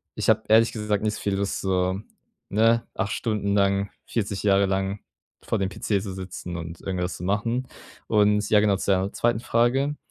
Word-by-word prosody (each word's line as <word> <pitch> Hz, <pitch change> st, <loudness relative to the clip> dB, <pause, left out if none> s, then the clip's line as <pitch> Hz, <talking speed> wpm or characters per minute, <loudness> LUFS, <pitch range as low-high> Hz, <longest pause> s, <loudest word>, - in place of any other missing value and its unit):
ich -, -, -1 dB
habe -, -, +4 dB
ehrlich 115 Hz, +1 st, +5 dB
gesagt 105 Hz, -2 st, -1 dB
nicht 105 Hz, -1 st, 0 dB
viel 100 Hz, -1 st, -1 dB
Lust 100 Hz, 0 st, -2 dB
so, 95 Hz, 0 st, 0 dB, 0.5 s
ne, 115 Hz, +3 st, +3 dB
8 110 Hz, -2 st, -1 dB
Stunden 105 Hz, -3 st, -1 dB
lang, 100 Hz, 0 st, +2 dB
40 100 Hz, -3 st, -2 dB
Jahre 100 Hz, -1 st, +4 dB
lang 95 Hz, +1 st, -1 dB, 0.4 s
vor -, -, -1 dB
dem 95 Hz, -1 st, 0 dB
PC 100 Hz, 0 st, -1 dB
zu 100 Hz, -3 st, -5 dB
sitzen 90 Hz, -2 st, -6 dB
und 85 Hz, 0 st, -7 dB
irgendwas 90 Hz, -2 st, -3 dB
zu -, -, -8 dB
machen. 115 Hz, +7 st, -1 dB, 0.4 s
Und 105 Hz, -1 st, +3 dB
ja 105 Hz, -, +6 dB
genau 105 Hz, -2 st, +3 dB
zu 100 Hz, -, -3 dB
deiner 95 Hz, +1 st, +1 dB
2. 120 Hz, -1 st, +1 dB
Frage. 130 Hz, +5 st, +1 dB
100 Hz, 185 wpm, -25 LUFS, 95-110 Hz, 0.5 s, ja